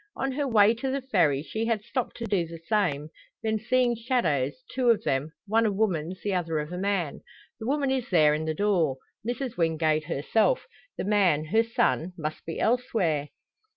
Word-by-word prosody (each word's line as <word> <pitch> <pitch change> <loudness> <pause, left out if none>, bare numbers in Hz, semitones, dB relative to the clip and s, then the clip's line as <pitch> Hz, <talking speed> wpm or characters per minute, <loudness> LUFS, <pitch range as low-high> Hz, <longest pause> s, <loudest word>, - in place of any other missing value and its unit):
On 270 - -1
her 285 +2 -1
way 215 -3 +5
to 240 +3 -3
the 270 0 -2
Ferry 165 - +2
she 220 +6 -3
had 225 -3 0
stopped 245 +2 -3
to 235 - -4
do 195 -6 0
the 165 0 -8
same; 165 -5 0 0.3
then 220 -1 0
seeing 240 +1 +2
shadows 225 - 0
two 255 -2 +2
of 230 - +3
them 135 +4 -1
one 220 +2 +2
a - - +1
woman's, 185 -4 -1
the 205 - -1
other 165 -3 -1
of 150 +2 -3
a 180 - -4
man. 195 -6 -1 0.4
The 220 - -5
woman 280 0 +1
is 260 -2 -1
there 155 -5 +5
in 155 +1 -2
the 160 0 -1
door 170 -8 +1 0.3
Mrs 245 +1 -3
Wingate 160 -2 +1
herself; 180 - +1 0.3
the - - -2
man, 190 -7 +3
her 220 +8 +3
son, 230 -7 0
must 155 -1 -5
be 165 - -4
elsewhere. 210 - +1
200 Hz, 190 wpm, -27 LUFS, 160-235 Hz, 0.4 s, way